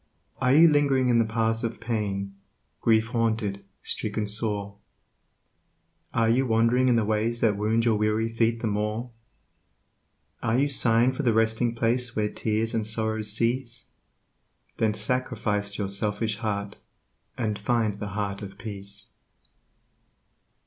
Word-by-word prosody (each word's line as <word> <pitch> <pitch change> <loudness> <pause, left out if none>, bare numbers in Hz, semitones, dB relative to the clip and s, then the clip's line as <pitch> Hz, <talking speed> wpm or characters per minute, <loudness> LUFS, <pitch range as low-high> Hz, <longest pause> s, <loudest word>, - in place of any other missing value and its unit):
Are 125 - +3
you 160 +5 +7
ling'ring 140 -4 +3
in 120 -1 +4
the 115 - +3
paths 115 0 0
of 115 0 -3
pain, 100 -4 -3 0.5
grief 110 0 +3
haunted, 110 -4 -1 0.2
stricken 105 - -2
sore? 105 -1 -2 1.3
Are 115 -1 +2
you 125 +4 +2
wand'ring 115 +3 +3
in 125 - +4
the 115 -2 +2
ways 110 +2 0
that 110 -3 +3
wound 110 +3 +1
your 115 -2 +3
weary 105 +1 +1
feet 115 0 0
the - - -2
more? 105 +3 -2 1.3
Are 115 +1 +1
you 140 +2 +2
sighing 120 -2 +3
for 130 - -4
the 120 -5 +2
Resting 110 +1 +1
Place 120 +1 0
where 105 -1 0
tears 110 +1 -1
and 110 -2 0
sorrows 110 -1 0
cease? 115 +2 -2 0.9
Then 110 -2 +2
sacrifice 105 -5 -1
your 100 - -2
selfish 105 +2 -1
heart 105 -2 -3 0.6
and 110 -4 -2
find 110 -1 0
the 105 - -4
Heart 100 -1 -2
of 100 -1 -9
Peace. 100 -2 -7
110 Hz, 140 wpm, -26 LUFS, 105-115 Hz, 1.3 s, you